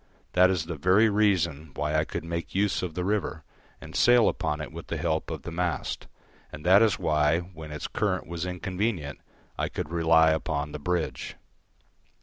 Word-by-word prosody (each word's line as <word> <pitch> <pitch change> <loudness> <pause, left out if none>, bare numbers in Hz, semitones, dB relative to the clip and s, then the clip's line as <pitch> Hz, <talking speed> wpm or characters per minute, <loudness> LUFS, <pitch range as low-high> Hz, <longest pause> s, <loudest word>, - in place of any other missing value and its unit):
That 90 +1 +6
is 90 -4 0
the 85 -1 -5
very 95 +8 +4
reason 85 -8 +1
why 75 +1 -1
I 80 0 +2
could - - -5
make 85 +1 -5
use 100 0 +1
of 90 -4 -4
the 90 - -2
river, 100 -6 -1 0.4
and - - -11
sail 120 -2 +5
upon 75 - -2
it 75 - -6
with - - -9
the - - -3
help - - -1
of - - -5
the 85 - -6
mast, 85 -1 -2 0.4
and 75 - -10
that 95 +4 +7
is 110 -3 +3
why, 75 +2 +2
when 80 -4 -10
its 75 - -5
current 100 -3 -1
was 85 0 -5
inconvenient, 90 -3 -3 0.4
I - - 0
could 75 - -5
rely 80 -1 +4
upon 75 -2 -2
the 75 - -6
bridge. 85 +2 -2
85 Hz, 185 wpm, -27 LUFS, 80-95 Hz, 0.4 s, that